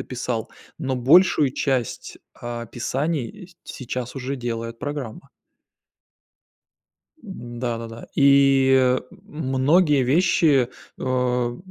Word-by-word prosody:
описал, 120 -3 -4 0.3
но 135 -4 -2
большую 145 +2 +4
часть 130 -6 -2 0.2
описаний, 120 +4 -3 0.2
эть 175 -1 -18
сейчас 125 -1 -6
уже 135 +2 -4
делает 115 -1 -5
программа. 140 -2 -6 1.9
М-да, 120 - -5
да-да. 115 0 -9
И, 135 -2 +4 0.3
многие 145 +1 +2
вещи, 145 -2 +3 0.3
а, 125 -1 -1
130 Hz, 80 wpm, -23 LUFS, 120-140 Hz, 1.9 s, большую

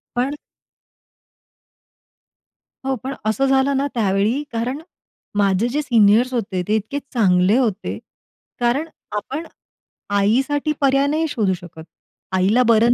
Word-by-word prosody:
पण 265 +4 0 2.5
हो, 270 0 0
पण 270 +1 -3
असं 220 +5 +1
झालं 270 0 +2
ना 280 +1 +1
त्यावेळी, 215 +5 +1
कारण 235 +4 -2 0.6
माझे 200 +3 +2
जे 295 +4 -1
सीनियर्स 235 0 +4
होते, 195 -6 -1
ते 215 - +2
इतके 220 +7 -2
चांगले 190 -1 +3
होते. 220 -6 -1 0.6
कारण 250 +7 +1 0.3
आपण 275 +10 -4 0.7
आईसाठी 270 +9 +1
पर्याय 275 +1 +3
नाही 315 +2 0
शोधू 215 -9 0
शकत. 170 -2 -10 0.5
आईला 195 +7 +3
बरं 230 +1 +5
240 Hz, 115 wpm, -20 LUFS, 205-275 Hz, 2.5 s, बरं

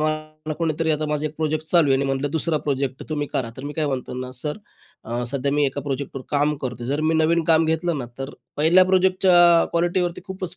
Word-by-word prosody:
मला 155 0 -3
कोणीतरी 160 0 -1
आता 155 0 0
माझा 150 0 -1
एक 155 - -7
प्रोजेक्ट 155 0 -1
चालू 170 -3 +4
आहे 135 - +5
आणि 140 - 0
म्हटलं, 135 +1 -1
"दुसरा 160 0 0
प्रोजेक्ट 135 -2 -1
तुम्ही 145 -2 -2
करा," 115 -3 -1
तर 130 - -8
मी 145 - -4
काय 155 0 -1
म्हणतो 130 -3 -3
ना, 130 0 -5
"सर, 150 +7 -5 0.5
अ, 120 +2 -3
सध्या 140 0 -1
मी 145 0 +2
एका 140 +1 -3
प्रोजेक्टवर 135 -1 -4
काम 145 +1 +2
करतो" 125 -2 -4
जर 140 +4 -1
मी 160 +1 +1
नवीन 160 +1 +2
काम 160 0 +4
घेतलं 160 0 0
ना, 125 - -4
तर 135 +1 -4 0.3
पहिल्या 165 +5 +5
प्रोजेक्टच्या 185 -2 +5
क्वालिटीवरती 175 +1 0
खूपच 185 -2 -6
155 Hz, 215 wpm, -23 LUFS, 140-165 Hz, 0.5 s, आहे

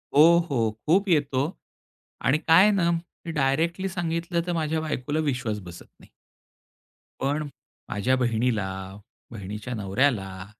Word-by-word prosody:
हो, 145 - +8 0.3
हो. 115 -6 +1
खूप 190 +6 +3
येतो 140 -5 +2 0.8
आणि 130 +4 +3
काय 165 +2 +5
आहे 210 - +5
ना, 185 -4 +2
मी 170 0 -5
डायरेक्टली 160 +6 0
सांगितलं, 170 -1 -2
तर 175 - 0
माझ्या 160 -1 -1
बायकोला 150 -1 -2
विश्वास 125 -8 -1
बसत 85 -2 -11
नाही. - - -18 1.1
पण 145 +2 -1 0.4
माझ्या 115 +6 +1
बहिणीला, 115 -4 0 0.6
बहिणीच्या 105 +3 -6
नवऱ्याला, 100 -3 -1
140 Hz, 125 wpm, -25 LUFS, 115-165 Hz, 1.1 s, हो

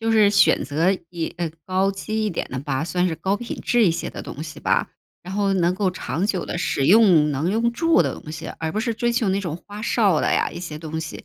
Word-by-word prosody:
就 225 0 0
是 215 -2 +5
选 200 - +4
择 165 +6 +1
以 170 -2 -4
呃， 170 -2 -2 0.2
高 190 +1 +1
级 215 +3 -3
一 210 - 0
点 170 - -3
的 130 - -4
吧， 140 +1 -2
算 180 +2 0
是 165 - -1
高 190 +5 0
品 240 +2 -6
质 240 -2 +3
一 - - +4
些 165 - -3
的 - - -7
东 150 - -7
西 155 -1 -8
吧。 - - +1 0.3
然 180 - -8
后 200 -1 +1
能 180 -1 +2
够 190 -1 0
长 185 0 -2
久 190 -5 -1
地 - - -4
使 140 -5 0
用， 180 -7 +6
能 150 +5 -1
用 230 +3 +1
住 330 +6 +3
的 - - -2
东 155 - -10
西， 160 +1 -7
而 160 0 -2
不 215 - -2
是 230 +1 0
追 240 +2 0
求 235 -3 +1
那 195 +1 0
种 170 -5 -4
花 205 0 -8
哨 205 -7 +2
的 - - +1
呀， - - +1
一 - - -8
些 155 -4 -6
东 160 0 -5
西。 160 - -7
185 Hz, 285 characters per minute, -22 LUFS, 160-215 Hz, 0.3 s, 用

